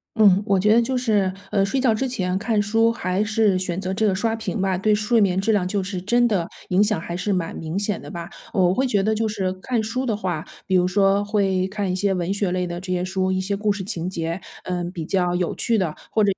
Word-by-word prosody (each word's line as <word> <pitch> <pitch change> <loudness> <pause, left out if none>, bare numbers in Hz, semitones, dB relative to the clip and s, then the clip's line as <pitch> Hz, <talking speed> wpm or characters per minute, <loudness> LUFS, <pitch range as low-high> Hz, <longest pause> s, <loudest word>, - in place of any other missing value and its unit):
嗯， 200 -3 +5
我 195 -1 +3
觉 210 +3 +4
得 235 - +5
就 255 +2 -1
是， 210 -6 +1 0.2
呃， 195 -1 +3
睡 230 +7 0
觉 250 -4 +3
之 265 +5 -1
前 185 -7 -2
看 220 -1 0
书， 225 +3 +3
还 190 -2 -1
是 215 -3 +2
选 185 -1 -2
择 190 0 -3
这 215 +2 +1
个 190 - +2
刷 225 +3 0
屏 225 -1 -4
吧， 190 -1 +1
对 210 +3 +2
睡 215 +2 +2
眠 190 -1 +2
质 220 +3 +1
量 190 -4 +1
就 195 0 -1
是 185 -1 -4
真 240 +5 +3
的， 180 -6 0 0.2
影 185 +3 +4
响 210 -5 +1
还 170 +1 -5
是 200 +3 -2
蛮 175 -3 -1
明 165 +3 -4
显 205 0 -1
的 - - -9
吧。 170 -2 -6 0.2
我 180 -1 +3
会 260 +4 +1
觉 205 -5 +1
得， 220 +1 +2
就 220 0 0
是 190 -3 -2
看 225 +5 -2
书 255 +4 -2
的 215 -3 0
话， 180 -6 -2 0.2
比 190 - +1
如 180 0 +4
说 195 +1 +3
会 195 -3 +1
看 200 -1 -2
一 185 - -1
些 195 0 +1
文 180 +2 -1
学 200 -3 -1
类 180 0 0
的 175 0 -5
这 185 - -5
些 180 0 0
书 190 0 -1
一 185 - 0
些 200 +2 -1
故 210 +1 0
事 195 -1 -3
情 180 -3 -3
节， 170 0 -3 0.2
嗯， 175 -1 -3
比 170 -4 -5
较 180 -1 +1
有 180 -1 -1
趣 230 -2 +1
的。 170 -6 -1
或 215 - +2
195 Hz, 280 characters per minute, -23 LUFS, 185-215 Hz, 0.2 s, 嗯